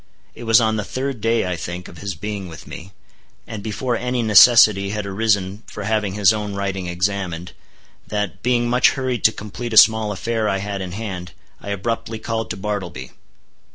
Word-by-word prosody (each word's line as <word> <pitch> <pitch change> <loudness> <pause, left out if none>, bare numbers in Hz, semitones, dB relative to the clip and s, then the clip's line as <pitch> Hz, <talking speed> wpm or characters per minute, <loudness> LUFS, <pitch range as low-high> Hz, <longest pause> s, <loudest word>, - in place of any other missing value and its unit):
It 120 - -10
was 115 -1 +6
on 110 -1 +1
the 105 - -2
third 130 +1 -4
day, 115 0 +1
I 90 -1 -2
think, 90 +2 -6
of 85 - -13
his 100 -3 -4
being 100 +2 -5
with 80 -3 -11
me, 95 +4 -10 0.5
and 110 - -7
before 120 +4 -2
any 125 0 -1
necessity 105 -2 +7
had 105 0 -3
arisen 100 -1 0
for 105 - -7
having 105 -2 -1
his 105 0 +4
own 105 -2 -4
writing 95 -2 -3
examined, 90 -1 -2 0.6
that, 105 -4 -3
being 120 0 +1
much 125 +1 +4
hurried 130 -3 -2
to 110 - +7
complete 110 +3 -7
a - - +1
small 110 -1 +6
affair 110 +2 -1
I 95 - 0
had 100 0 -4
in 90 -2 -6
hand, 95 -5 -6 0.3
I - - -8
abruptly 110 +3 -3
called 115 -2 -3
to - - -4
Bartleby. 95 -10 -5
105 Hz, 190 wpm, -21 LUFS, 95-115 Hz, 0.6 s, necessity